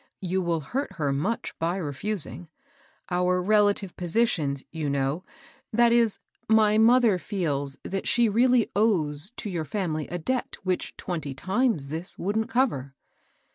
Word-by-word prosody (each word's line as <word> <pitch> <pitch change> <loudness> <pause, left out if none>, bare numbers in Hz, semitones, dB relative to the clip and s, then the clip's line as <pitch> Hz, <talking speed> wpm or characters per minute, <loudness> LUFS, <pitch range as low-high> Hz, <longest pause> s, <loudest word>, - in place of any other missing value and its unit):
You 185 0 0
will 170 -2 0
hurt 265 - -3
her 145 -4 -1
much 190 +12 -2
by 170 +3 0
reftising. 170 - -3 0.6
Our 180 +1 +2
relative 205 -1 +2
positions, 170 - 0
you 155 -3 -3
know, 140 +5 -1 0.2
— - - -29
that 235 +1 +5
is, 235 -3 +3 0.3
my 215 -1 +5
mother 230 -4 +5
feels 145 -9 -2
that 195 0 -3
she 240 -1 +4
really 240 +2 +3
awes 180 -5 +1
to 220 - -5
your 175 -5 -2
family 155 -3 -2
a 175 - -4
debt 250 +10 -2
which 185 -1 -2
twenty 155 -6 -4
times 190 - 0
this 165 +4 -4
wouldn't 215 +4 -1
cover." 140 - 0
185 Hz, 145 wpm, -26 LUFS, 155-220 Hz, 0.6 s, that